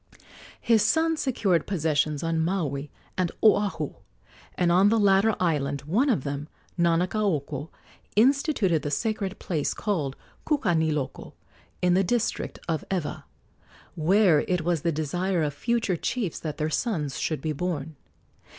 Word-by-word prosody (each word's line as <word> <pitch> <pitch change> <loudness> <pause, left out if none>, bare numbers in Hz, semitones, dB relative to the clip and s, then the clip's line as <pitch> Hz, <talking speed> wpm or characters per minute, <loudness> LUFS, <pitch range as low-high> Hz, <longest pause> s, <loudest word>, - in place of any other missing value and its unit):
His 225 -2 +3
sons 320 +8 +2
secured 195 - +1
possessions 155 -4 0
on 165 0 0
Maui 155 -5 -1 0.3
and 180 -2 +1
Oahu, 205 -2 +3 0.6
and 175 -1 +2
on 190 +4 +5
the 225 +1 +3
latter 200 +1 +4
island 145 -5 0
one 215 - +1
of 185 - +1
them 145 +1 -4 0.3
Nanakaoko 170 -4 0 0.5
instituted 230 - +3
the 145 - -3
sacred 200 +6 -2
place 155 -5 -2
called 155 -11 -2 0.3
Kukaniloko, 160 - 0 0.5
in 180 0 +4
the 190 +2 +4
district 230 +5 -1
of 160 -2 -1
Ewa, 180 -6 -3 0.7
where 175 0 +4
it 180 -2 +1
was 170 -1 0
the 170 - +1
desire 170 +4 -1
of 145 -1 -1
future 225 +4 0
chiefs 220 -2 -2
that 155 -2 -5
their 155 +1 -1
sons 150 - -1
should 155 - -1
be 155 -1 -2
born. 160 -1 -3
175 Hz, 135 wpm, -26 LUFS, 150-205 Hz, 0.7 s, on